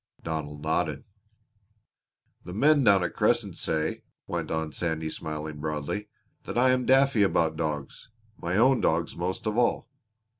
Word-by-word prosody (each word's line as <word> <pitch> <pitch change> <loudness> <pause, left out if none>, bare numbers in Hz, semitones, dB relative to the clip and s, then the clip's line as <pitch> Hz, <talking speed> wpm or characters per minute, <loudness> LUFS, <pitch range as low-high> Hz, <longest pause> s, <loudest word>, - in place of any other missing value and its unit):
Donald 75 -2 -4
nodded. 80 -2 -1 1.4
"The 90 - -8
men 145 +5 +4
down 100 -5 +5
at 90 - -2
Crescent - - +1
say," 80 -1 -1 0.2
went - - -3
on 80 -1 -2
Sandy 80 -2 -2
smiling 75 -2 -5
broadly, 75 +7 -3 0.4
"that - - -4
I 130 +1 +5
am 130 -1 0
daffy 135 -3 +4
about 80 -5 +2
dogs 75 +3 -4 0.3
my 90 0 -2
own 130 +3 +4
dogs 80 +1 0
most 95 +7 -3
of 110 +2 0
all. 120 - +1
85 Hz, 145 wpm, -27 LUFS, 80-110 Hz, 1.4 s, down